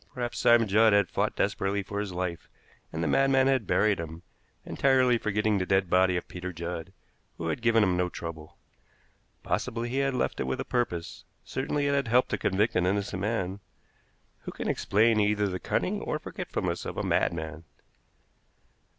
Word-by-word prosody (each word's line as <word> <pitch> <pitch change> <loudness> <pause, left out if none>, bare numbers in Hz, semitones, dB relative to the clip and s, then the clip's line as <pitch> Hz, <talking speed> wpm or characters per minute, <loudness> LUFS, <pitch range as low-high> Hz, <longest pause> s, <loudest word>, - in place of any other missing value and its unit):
Perhaps 120 -1 -3
Simon 120 -1 +5
Judd 110 +2 +5
had 100 -3 +3
fought - - 0
desperately 100 +1 0
for 100 +1 -5
his 105 -2 -3
life, 90 -2 -4 0.4
and 80 +1 -3
the - - 0
madman 135 - +3
had 135 -5 +1
buried 95 +2 +2
him, 80 +1 -7 0.4
entirely 130 -3 +3
forgetting 105 -1 0
the 90 - -1
dead 95 -2 +1
body 90 0 +4
of - - -5
Peter 90 +1 -6
Judd, 85 +1 -6 0.5
who 80 - -3
had 80 - -2
given 115 -2 +4
him 95 -3 +2
no 90 0 +1
trouble. 80 -3 -8 0.9
Possibly 115 +1 -2
he 130 - -2
had 135 -1 0
left 125 - -1
it - - -1
with 65 - -2
a - - -3
purpose; 90 -9 -2 0.2
certainly 145 +2 -2
it 140 - +1
had 140 -3 +1
helped 125 +2 +3
to - - -2
convict 105 +4 +1
an 90 0 +2
innocent 100 -1 -1
man. 100 -3 -2 0.8
Who - - -7
can - - -5
explain 110 +2 +2
either 105 0 +2
the 90 -1 -3
cunning - - -1
or - - -2
forgetfulness - - -4
of - - -6
a - - -1
madman? 80 -1 -1
100 Hz, 180 wpm, -28 LUFS, 90-115 Hz, 0.9 s, Simon